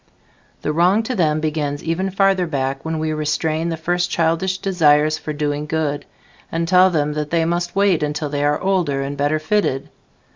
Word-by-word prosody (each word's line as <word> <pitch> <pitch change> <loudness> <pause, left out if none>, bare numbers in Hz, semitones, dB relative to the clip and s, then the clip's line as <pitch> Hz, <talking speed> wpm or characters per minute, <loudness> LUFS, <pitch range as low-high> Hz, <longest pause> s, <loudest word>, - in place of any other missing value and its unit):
The 150 - -1
wrong 180 +7 +3
to 250 +3 -3
them 155 -5 +1
begins 150 -2 -2
even 175 +4 -1
farther 195 -1 +2
back, 135 -2 -2
when 160 0 -3
we 155 0 -1
restrain 155 +2 -1
the 165 - -3
first 175 +2 -1
childish 170 +3 0
desires 155 -5 +2
for 155 - -5
"doing 150 0 -2
good", 150 -2 -2 0.5
and 165 0 -1
tell 185 +1 +5
them 150 -4 0
that 150 0 -3
they 165 0 +1
must 175 +1 -2
wait 195 -5 +3
until 150 0 -2
they 145 0 -2
are 145 0 +1
older 180 -8 0
and 140 +1 -4
better 145 +2 +1
fitted. 155 -4 -1
160 Hz, 185 wpm, -20 LUFS, 150-175 Hz, 0.5 s, tell